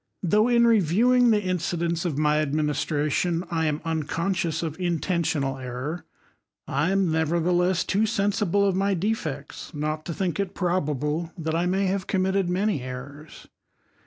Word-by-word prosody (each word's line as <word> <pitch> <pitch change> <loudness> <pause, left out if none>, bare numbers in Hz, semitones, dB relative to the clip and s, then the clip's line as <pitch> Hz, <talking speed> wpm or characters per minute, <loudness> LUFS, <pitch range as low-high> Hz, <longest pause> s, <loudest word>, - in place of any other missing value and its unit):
though 210 +6 +3
in 235 -1 +4
reviewing 230 +4 +4
the 210 -2 +3
incidents 170 -1 -1
of 155 -5 -1
my 150 0 +2
adminis 150 -1 0
itration, 165 +3 0
I 160 -1 +1
am 150 0 -1
unconseious 165 +2 -1
of 160 +1 -4
intentional 170 -6 -1
error; 130 +6 -5 0.6
I 140 +5 0
am 195 -3 +2
nevertheless 170 +3 +1
too 215 +3 +1
sensible 200 -2 +1
of 195 -2 +1
my 195 +1 +1
defects 165 -8 -3
not 155 +1 -2
to 170 - -3
think 185 -1 -2
it 195 -2 -2
bable 160 -2 -1
that 160 -1 -3
I 170 +2 +1
may 190 +2 +1
have 190 0 -1
committed 190 -1 +1
many 190 -4 0
errors. 135 +4 -9
170 Hz, 150 wpm, -25 LUFS, 155-195 Hz, 0.6 s, in